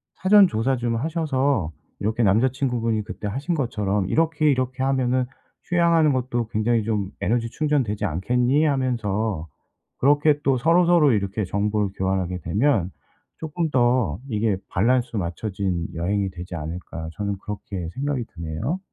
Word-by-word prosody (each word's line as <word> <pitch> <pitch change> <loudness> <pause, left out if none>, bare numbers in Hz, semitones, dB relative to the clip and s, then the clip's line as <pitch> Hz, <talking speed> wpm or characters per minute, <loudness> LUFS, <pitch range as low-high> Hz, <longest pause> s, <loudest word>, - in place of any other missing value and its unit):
사전 195 +2 +6
조사 120 +3 0
좀 120 -2 -1
하셔서 140 - 0 0.3
이렇게 110 +3 0
남자 110 +6 +4
친구분이 120 -5 -1
그때 105 - -6
하신 135 - -2
것처럼 105 - -1
"이렇게, 155 -1 +2
이렇게 130 -1 0
하면은 130 -1 +1 0.4
휴양하는 170 -4 +3
것도 120 -3 -1
굉장히 115 +1 +1
좀 105 -3 -2
에너지 115 +4 +1
충전되지 125 -8 0
않겠니?" 125 - +1
하면서 110 - -1 0.5
그렇게 145 +2 +3
또 135 -2 +3
서로서로 170 0 +4
이렇게 100 0 -1
정보를 105 +1 0
교환하게 95 -1 -1
되면 100 - +1 0.5
쪼끔 160 +1 -2
더 120 - +2
이게 105 -3 +1
'발란스 120 +3 +1
맞춰진 95 -1 -2
여행이 95 +4 0
되지 90 0 -8
않을까.' 80 0 -6
저는 100 0 -3
그렇게 100 -4 -6
생각이 135 -1 -2
드네요. 85 - -3
115 Hz, 335 characters per minute, -23 LUFS, 100-135 Hz, 0.5 s, 사전